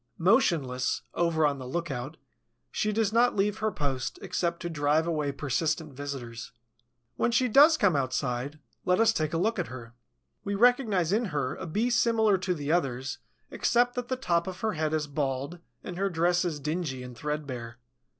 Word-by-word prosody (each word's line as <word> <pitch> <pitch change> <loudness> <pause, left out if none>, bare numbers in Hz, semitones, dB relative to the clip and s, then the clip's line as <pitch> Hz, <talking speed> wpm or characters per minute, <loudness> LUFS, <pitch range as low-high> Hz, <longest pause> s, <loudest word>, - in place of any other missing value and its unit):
Motionless, 165 - +2
ever 165 -2 +2
on 140 -2 0
the 130 - -7
lookout, 150 -1 -4 0.5
she 215 - 0
does 215 -1 0
not 240 +2 +4
leave 205 +1 +1
her 220 0 0
post 135 -6 -3
except 170 -1 -1
to - - -2
drive 155 0 +1
away 155 -4 -1
persistent 150 +3 -1
visitors. 130 -4 -6 0.6
When - - +2
she 240 +2 +2
does 295 +7 +7
come 195 - +3
outside, 130 +1 -1 0.3
let 180 +2 +2
us 225 0 +5
take 155 -5 -1
a 165 - -1
look 220 +7 0
at - - -1
her. 115 -2 -9 0.5
We 200 0 -2
recognize 215 -6 +3
in 230 +3 +2
her 145 -8 -2
a - - -7
Bee 220 +9 0
similar 225 -4 +3
to 185 -1 -1
the 145 -1 -3
others 130 -6 -1 0.3
except 245 +1 +2
that 245 -1 -4
the 255 - -1
top 170 -10 0
of 185 0 -6
her 220 -1 0
head 155 -2 -1
is 155 -1 0
bald 140 +2 -3 0.2
and 180 - -6
her 195 +1 +1
dress 175 +1 +2
is 160 -4 -2
dingy 150 -4 -3
and 125 -1 -9
threadbare. 130 -4 -5
165 Hz, 180 wpm, -28 LUFS, 140-205 Hz, 0.6 s, does